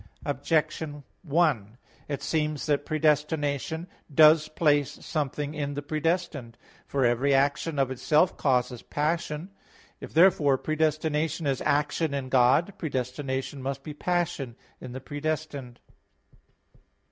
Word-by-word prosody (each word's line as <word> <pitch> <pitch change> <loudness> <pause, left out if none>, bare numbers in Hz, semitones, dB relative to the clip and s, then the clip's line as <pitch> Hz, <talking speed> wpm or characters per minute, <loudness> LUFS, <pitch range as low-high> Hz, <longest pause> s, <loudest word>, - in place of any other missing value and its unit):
Objection 145 +1 -1 0.2
1: 145 - +1 0.3
It 140 -2 -4
seems 155 -2 -1
that 145 -1 0
predestination 150 +1 0 0.2
does 155 +1 +6
place 145 -3 +2
something 150 -1 -2
in 145 -2 -3
the 145 - -4
predestined. 155 -5 -2 0.3
For 135 -2 +1
every 130 +4 +3
action 140 +3 +1
of 135 -1 +1
itself 150 +6 +2
causes 125 -3 0
passion. 155 +3 -2 0.5
If - - -9
therefore 160 -5 +5
predestination 155 +1 0
is 135 -2 0
action 145 +1 +1
in 135 -2 -4
God, 130 +9 +4
predestination 130 -1 -3
must 135 +1 -4
be 150 - -6
passion 150 -7 -2 0.2
in 125 - -8
the 130 - -6
predestined. 145 -4 -4
145 Hz, 115 wpm, -27 LUFS, 135-155 Hz, 0.5 s, does